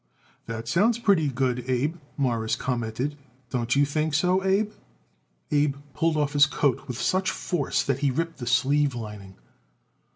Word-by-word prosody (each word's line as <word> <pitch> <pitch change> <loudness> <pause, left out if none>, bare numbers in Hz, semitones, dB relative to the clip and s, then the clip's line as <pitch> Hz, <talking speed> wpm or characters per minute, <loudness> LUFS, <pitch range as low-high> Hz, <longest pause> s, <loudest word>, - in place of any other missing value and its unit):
"That 115 0 -5
sounds 215 +6 +3
pretty 200 -10 +3
good, 125 -2 0
Abe," 135 +6 +1 0.2
Morris 115 -5 0
commented. 125 +3 -2 0.4
"Don't 120 -1 0
you 145 +1 +4
think 155 +1 -1
so, 180 +4 +2
Abe?" 200 +2 +2 0.8
Abe 145 -1 +2 0.2
pulled 160 +3 +1
off 145 -1 0
his 145 0 +6
coat 140 0 0
with 125 -2 -5
such 185 0 +1
force 165 -6 -1
that 135 -1 -1
he 145 -1 +2
ripped 165 +5 -2
the 120 - -5
sleeve 140 +2 +2
lining. 105 -4 -8
140 Hz, 155 wpm, -26 LUFS, 125-160 Hz, 0.8 s, his